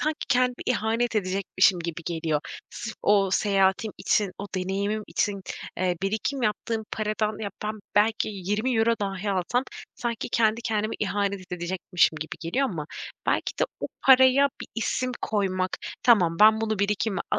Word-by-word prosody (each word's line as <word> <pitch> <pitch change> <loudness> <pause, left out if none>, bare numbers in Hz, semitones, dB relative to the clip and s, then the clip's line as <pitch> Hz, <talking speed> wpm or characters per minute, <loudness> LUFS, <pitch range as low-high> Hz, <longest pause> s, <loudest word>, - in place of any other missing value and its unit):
sanki 310 +1 -1
kendime 250 -1 +3
ihanet 230 -1 0
edecekmişim 190 -1 +2
gibi 170 0 -5
geliyor. 160 -3 -1 0.3
Sırf 220 -2 -6
o 200 -2 +4
seyahatim 195 +1 +2
için 205 -3 +1
o 200 - -5
deneyimim 200 +3 -1
için, 200 -1 -1 0.4
eee, 180 -1 +1
birikim 220 +7 -1
yaptığım 220 0 -1
paradan 215 0 -1
ya, 200 - -3
ben 215 - -1 0.2
belki 215 +1 +3
€20 225 +4 +1
dahi 195 0 -2
alsam 195 +7 0 0.3
sanki 235 -1 -3
kendi 230 0 +2
kendime 215 -2 -1
ihanet 200 -2 -2
edecekmişim 175 -1 +1
gibi 160 - -5
geliyor. 255 +12 0
Ama 155 -5 -5 0.4
belki - - 0
de - - +5 0.2
o - - -1 0.2
paraya 265 +1 +6
bir - - -7
isim 255 +2 -1
koymak, 185 -3 0 0.3
tamam, 180 -9 +4
ben 220 +1 +7
bunu 215 -2 -1
birikime 200 -1 0
a - - +1
210 Hz, 150 wpm, -26 LUFS, 190-225 Hz, 0.4 s, ben